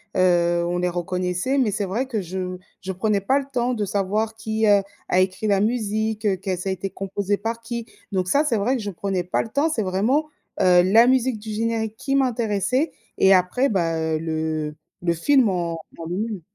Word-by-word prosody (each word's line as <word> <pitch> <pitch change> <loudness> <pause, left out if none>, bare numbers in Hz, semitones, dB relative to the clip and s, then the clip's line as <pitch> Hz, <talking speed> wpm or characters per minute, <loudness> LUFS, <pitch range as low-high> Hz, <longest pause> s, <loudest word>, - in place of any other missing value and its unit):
heu, 175 -1 +3
on 175 +1 -1
les 180 0 0
reconnaissait, 180 +7 -1
mais 250 -6 +2
c'est 205 +1 -2
vrai 220 +8 -1
que 225 -5 -2
je 185 0 -4 0.2
je 190 - -5
prenais 205 +2 +1
pas 260 +8 +2
le 280 - -6
temps 250 -1 0
de 215 -3 -1
savoir 205 +3 -1
qui, 220 0 -1
heu, 205 -1 +5 0.3
a 180 - +3
écrit 185 +3 0
la 200 -2 +3
musique, 220 0 -1
heu, 195 -3 +2
qu'elle 190 -1 -3
ça 185 +2 -3
a - - +1
été 190 +1 -3
composée 195 +1 -2
par 225 +3 -4
qui. 235 0 -5 0.3
Donc 185 -1 0
ça, 285 +9 +3
c'est 250 -6 +1
vrai 245 +6 +1
que 235 - -5
je 205 - -4
prenais 190 0 -2
pas 180 - 0
le 225 - -7
temps. 285 +6 +1
C'est 235 -9 -1
vraiment, 225 +12 +1 0.3
heu, 180 -1 +6
la 220 +6 +6
musique 255 -3 +2
du 220 +1 -9
générique 220 0 -2
qui 275 +3 -1
m'intéressait 250 - +1 0.2
et 195 0 +6
après 185 +9 +3
bah, 170 -8 0
heu, 160 0 0
le 155 -1 -2 0.3
le 170 -1 +1
film 245 - +3
en 175 -2 -1 0.2
en 165 - -7
lui 175 +2 -3
même. 215 -4 -3
200 Hz, 220 wpm, -23 LUFS, 180-230 Hz, 0.3 s, heu